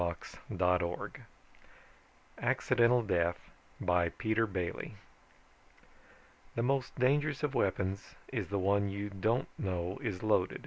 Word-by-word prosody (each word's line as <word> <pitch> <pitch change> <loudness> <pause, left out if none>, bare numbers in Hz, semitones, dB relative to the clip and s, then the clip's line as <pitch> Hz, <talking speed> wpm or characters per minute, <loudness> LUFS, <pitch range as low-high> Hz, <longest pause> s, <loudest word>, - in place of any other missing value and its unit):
net 90 0 +3 1.6
ACCIDENTAL 120 -1 +3
DEATH 85 -4 +1 0.4
BY 90 -1 +2
PETER 110 +2 +1
BAILY 90 -4 -3 1.6
_The 115 - +2
most 135 0 0
dangerous 145 +3 +2
of 145 -2 +1
weapons 95 -3 0 0.2
is - - -1
the 100 - -1
one 100 +1 +2
you 100 +1 -4
don't 110 +6 +1
know 90 -1 -2
is 100 -5 -3
loaded. 100 -4 +2
100 Hz, 105 wpm, -33 LUFS, 90-120 Hz, 1.6 s, net